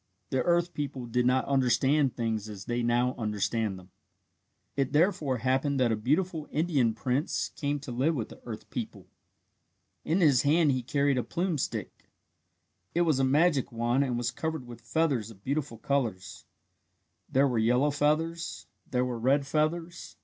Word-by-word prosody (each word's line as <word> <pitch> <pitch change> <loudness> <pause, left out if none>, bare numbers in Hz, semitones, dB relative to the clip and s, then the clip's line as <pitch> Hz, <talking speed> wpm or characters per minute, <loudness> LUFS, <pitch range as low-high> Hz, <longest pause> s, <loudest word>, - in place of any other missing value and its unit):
The 130 - +1
earth 175 0 +1
people 140 -4 -4
did 125 +1 +1
not 130 +1 +2
understand 135 +1 +2
things 110 -3 -2
as 100 -2 -8
they 120 0 -1
now 120 +2 +2
understand 105 -1 -1
them. 90 0 -15 0.8
It 135 -1 -1
therefore 155 -5 +2
happened 130 +3 0
that 125 -3 +3
a - - +2
beautiful 155 - 0
Indian 145 -8 +1
prince 130 +5 -1
came 145 0 -2
to 140 -3 -7
live 135 +7 +1
with 115 -6 -3
the - - -13
earth - - -8
people. - - -5 1.0
In 165 +5 +1
his 145 -8 +5
hand 150 +1 +4
he 130 -1 0
carried 140 +1 +1
a - - -1
plume 175 -3 -1
stick. - - -5 0.9
It 175 - +3
was 155 -6 +2
a - - +3
magic 140 0 +3
wand 120 +3 +1
and 125 -3 -1
was 120 0 -1
covered 160 +1 -4
with 120 -1 -11
feathers 130 -4 0
of 100 -3 -15
beautiful 140 -3 -2
colours. 110 -8 -2 0.9
There 135 +2 +4
were 120 -4 0
yellow 125 +6 +3
feathers. 160 +3 -1 0.2
There 125 0 +1
were 125 -2 -3
red 135 +4 +2
feathers. 165 +4 -2
135 Hz, 165 wpm, -29 LUFS, 120-150 Hz, 1.0 s, his